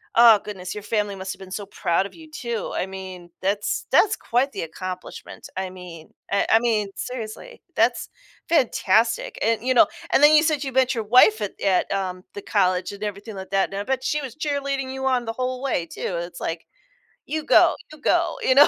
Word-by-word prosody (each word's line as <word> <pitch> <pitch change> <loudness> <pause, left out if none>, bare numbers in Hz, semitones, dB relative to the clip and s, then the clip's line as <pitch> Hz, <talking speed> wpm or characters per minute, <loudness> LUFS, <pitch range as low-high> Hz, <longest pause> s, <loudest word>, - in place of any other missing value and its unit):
oh 230 -2 +8
goodness, 185 -3 -6
your 210 - -6
family 210 -1 -1
must 190 0 -5
have 190 - -16
been 190 -1 -11
so 205 +1 -4
proud 180 -1 0
of - - -9
you, 320 -1 -14
too. 235 -6 -4
I - - 0
mean, 190 -2 -9
that's 200 +2 -1
that's 430 0 +5
quite 255 +4 0
the - - -3
accomplishment, 185 +3 -7
I 190 0 -2
mean 180 -3 -11 0.2
I 200 - +2
I 225 - +7
mean, 220 -4 0
seriously, 250 - -7 0.2
that's - - +2 0.4
fantastic, 230 - +2
and, 225 +1 +1
you 255 +1 +2
know 300 +5 +6 0.3
and - - +5
then 300 +1 +8
you 305 - +6
said 300 -2 +1
you 265 - -3
met 260 0 +3
your 225 - -2
wife 220 -1 +6
at 205 - -4
at, 190 -2 +2
um, 185 -2 -3
the 205 - -5
college 185 -3 +1
and 200 - -8
everything 205 +1 -5
like 190 0 -8
that, 195 0 +2
and 195 - -4
I - - -2
bet 260 +3 -2
she 300 +3 0
was 260 -4 -7
cheerleading 280 -3 -2
you 265 0 -4
on 255 -2 +2
the 225 - -3
whole 255 +1 -3
way 240 -11 0
too, 180 - -4
it's, 170 0 -7
like, 165 0 -4 0.6
"You 310 0 -3
go - - +5 0.2
you 305 - -13
go," - - +2
you 260 - +4
know? 290 +2 +9
215 Hz, 215 wpm, -23 LUFS, 190-260 Hz, 0.6 s, know